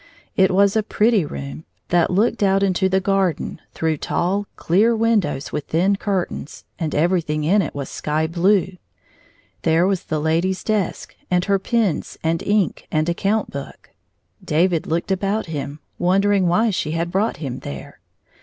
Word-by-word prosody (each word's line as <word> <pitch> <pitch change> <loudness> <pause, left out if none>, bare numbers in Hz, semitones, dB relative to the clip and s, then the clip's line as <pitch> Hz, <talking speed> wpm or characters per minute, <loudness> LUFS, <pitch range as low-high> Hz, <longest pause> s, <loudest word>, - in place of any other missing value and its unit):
It 190 0 +4
was 200 +2 +3
a 220 - +4
pretty 215 -1 +2
room, 70 - -7 0.3
that 175 -1 +3
looked 205 +6 +1
out 195 0 +3
into 190 0 +2
the 190 0 +2
gar 195 -2 +2
den - - -7
through 160 -1 0
tall 195 +7 -1
clear 215 +7 +2
windows 210 -11 0
with 150 - -3
thin 185 +5 +2
curtains, 195 -6 -3 0.2
and 160 -2 -2
everything 155 -2 +1
in 195 +7 +3
it 155 - -4
was 140 -1 -4
sky 155 +1 -1
blue. 180 +2 +1 0.8
There 165 +1 +3
was 195 -2 0
the 155 - -1
lady's 165 +5 0
desk 210 -5 -2
and 180 0 +2
her 200 -1 +2
pens 210 -5 -1
and 165 +1 0
ink 205 -2 0
and 155 0 +1
account 200 +5 0
book. 140 0 -8 0.5
David 170 +1 +1
looked 170 +4 -1
about 200 +3 0
him, 145 -3 -5 0.2
wondering 195 +1 +3
why 215 +6 +3
she 155 -5 -2
had 170 +1 -2
brought 205 +5 0
him 130 -5 -5
there. 70 -1 -8
180 Hz, 165 wpm, -21 LUFS, 160-200 Hz, 0.8 s, It